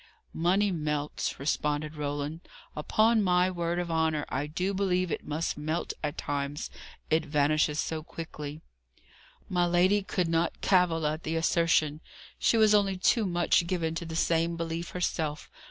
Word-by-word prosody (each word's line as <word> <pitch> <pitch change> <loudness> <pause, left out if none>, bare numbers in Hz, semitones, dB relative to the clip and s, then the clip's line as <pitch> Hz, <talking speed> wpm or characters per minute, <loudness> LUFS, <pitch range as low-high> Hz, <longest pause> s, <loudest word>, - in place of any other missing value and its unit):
"Money 190 +5 +2
melts," 150 -3 -2
responded 150 +1 -1
Roland. 145 +1 -3 0.4
"Upon 215 +8 +3
my 180 -1 +3
word 170 -1 -2
of 175 -1 -2
honour, 160 -2 +1
I 140 +3 -2
do 180 +6 -2
believe 185 -2 0
it - - -3
must 155 0 -2
melt 155 +3 -2
at 150 +2 -2
times; 145 0 -3 0.4
it 160 +1 +3
vanishes 150 0 +1
so 160 -1 -2
quickly." 155 -2 -7 0.9
My 175 -1 +1
lady 185 +4 +3
could 185 -2 -1
not 165 +1 0
cavil 175 -4 +3
at 155 +2 -1
the 160 0 -3
assertion. 165 -2 +2 0.4
She 230 - +3
was 215 -1 +5
only 200 -2 +3
too 210 +3 +2
much 175 -1 +2
given 170 -3 -1
to 170 +1 -4
the 160 - -6
same 165 0 +1
belief 165 +1 -3
herself. 160 -4 -2
165 Hz, 155 wpm, -29 LUFS, 150-180 Hz, 0.9 s, was